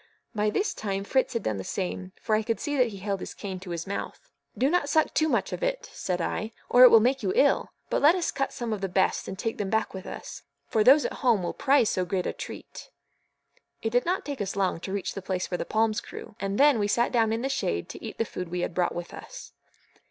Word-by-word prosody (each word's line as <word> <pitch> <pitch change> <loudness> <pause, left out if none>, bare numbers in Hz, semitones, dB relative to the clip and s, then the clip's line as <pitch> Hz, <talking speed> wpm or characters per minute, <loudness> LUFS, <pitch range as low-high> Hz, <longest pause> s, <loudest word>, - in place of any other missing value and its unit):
By 210 -1 +1
this 400 - 0
time 195 -2 -3
Fritz 260 +6 +1
had 230 - -2
done 110 -2 -1
the 95 - -4
same, 185 - -4
for 220 - -2
I 215 - +4
could 225 +1 -2
see 290 -1 -2
that 255 -3 +4
he 205 -3 -7
held 195 0 -2
his - - -7
cane 190 -3 -6
to 185 0 -10
his 170 -1 -4
mouth. 200 - -6 0.3
"Do 265 - +3
not 305 -2 +1
suck 315 0 +2
too 315 0 +2
much - - 0
of - - -4
it," - - -2
said 180 -1 -2
I, 215 +6 -2 0.2
"or 245 - +5
it 255 - +12
will 225 - +8
make 260 +4 +2
you - - 0
ill; - - +3 0.2
but - - +1
let 305 +5 +6
us 355 -2 -1
cut 275 0 -1
some 235 -2 -3
of 205 - -4
the 195 - -2
best 190 +1 +1
and 190 - -5
take 225 +2 -3
them 200 -2 -1
back 220 +1 0
with 190 -1 -7
us, - - -8 0.2
for 215 +9 +2
those 275 +6 +7
at - - -2
home 235 -8 +3
will 175 - -2
prize 275 -5 +3
so 185 - 0
great 180 0 -2
a - - -1
treat." - - -9 0.9
It 225 - 0
did 245 +1 +3
not 370 +2 0
take 285 -5 -4
us 195 0 -3
long 190 -4 0
to 190 - -6
reach 200 -1 -2
the 195 - -6
place 185 0 -3
where 180 - -1
the - - -2
palms 220 +2 +1
grew, - - -10
and 195 0 -2
then 285 -4 +6
we 205 - +1
sat 235 +3 +2
down 225 -3 +2
in 225 +2 -1
the - - +1
shade 85 - -1
to - - -9
eat 220 - -7
the 225 - 0
food 180 -4 -6
we 180 +1 -2
had 180 - -2
brought 175 0 0
with 175 0 -6
us. - - -10
215 Hz, 270 wpm, -27 LUFS, 190-255 Hz, 0.9 s, it